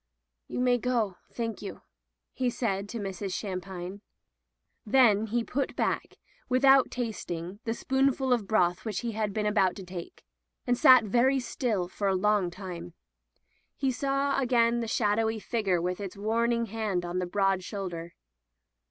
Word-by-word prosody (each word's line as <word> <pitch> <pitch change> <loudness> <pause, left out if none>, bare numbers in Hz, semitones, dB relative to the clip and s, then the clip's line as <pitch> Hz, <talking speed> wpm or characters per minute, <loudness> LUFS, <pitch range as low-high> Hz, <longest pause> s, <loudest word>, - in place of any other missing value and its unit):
"You - - -4
may 250 -1 +3
go, 225 -6 0
thank 230 -3 -4
you," 200 - -8 0.5
he 255 -1 0
said 205 -5 -2
to 235 - -5
Mrs. 195 -2 -4
Shampine. 190 -1 -5 0.8
Then 220 -3 +4
he 235 +2 0
put 270 +3 -2
back, - - -1 0.3
with 255 +2 +2
out 270 -1 +6
tasting, 200 -6 -4
the 225 0 -1
spoonful 265 0 +1
of 225 -5 -1
broth 180 -4 +2
which 210 -5 -3
he 235 - -2
had 215 -1 -1
been 210 +1 -2
about 200 -3 +2
to 195 - -8
take, 180 -1 -9 0.4
and 245 - +2
sat 255 0 +7
very 245 +6 +3
still 230 -6 -1
for 200 +2 -3
a 190 - +2
long 205 -1 +2
time. 175 -2 -8 0.8
He 270 -2 0
saw 275 +3 0
again 240 -2 +3
the 230 - -2
shadowy 220 0 +1
figure 210 -5 0
with 180 +2 -2
its 200 -1 -6
warning 230 +3 +1
hand 215 -4 -2
upon 175 +1 -2
the 180 - -2
broad 195 0 +1
shoulder. 175 -4 -6
215 Hz, 160 wpm, -28 LUFS, 190-240 Hz, 0.8 s, sat